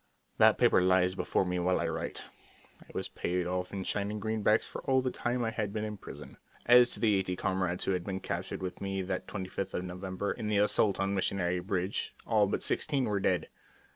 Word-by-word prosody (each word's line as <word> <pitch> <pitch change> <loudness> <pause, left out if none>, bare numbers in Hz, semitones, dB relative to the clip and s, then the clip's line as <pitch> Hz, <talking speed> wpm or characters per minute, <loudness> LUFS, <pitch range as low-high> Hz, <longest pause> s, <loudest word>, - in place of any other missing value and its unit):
_" - - -37
That - - +6
paper - - +5
lies 90 0 +3
before 95 - 0
me 90 0 -1
while 90 +1 +2
I 85 - 0
write. 80 - -4 0.6
I - - -17
was - - -3
paid 90 0 -2
off 90 0 -2
in 95 -1 -4
shining 105 +2 -2
greenbacks 110 0 +2
for - - -7
all 130 0 +5
the 130 - 0
time 120 0 -1
I 115 - 0
had 105 -2 -2
been 105 +1 -3
in 105 -1 -4
prison. - - -10 0.3
As 120 0 +7
to - - -9
the 110 -3 +3
eighty 95 -2 0
comrades 90 -1 -1
who - - 0
had 90 -2 -1
been 95 -1 -3
captured 95 - -4
with 90 - -5
me 95 -1 -2
that 95 0 -3
25th 95 -1 -4
of 90 - -2
November 95 +2 -4
in 110 - -4
the 105 -1 +1
assault 105 0 +3
on 100 0 0
Missionary 90 -2 0
Ridge, 95 +1 -2
all 105 -3 +3
but - - -2
sixteen 140 -4 0
were 105 -2 0
dead. 90 -1 0
95 Hz, 220 wpm, -31 LUFS, 90-105 Hz, 0.6 s, As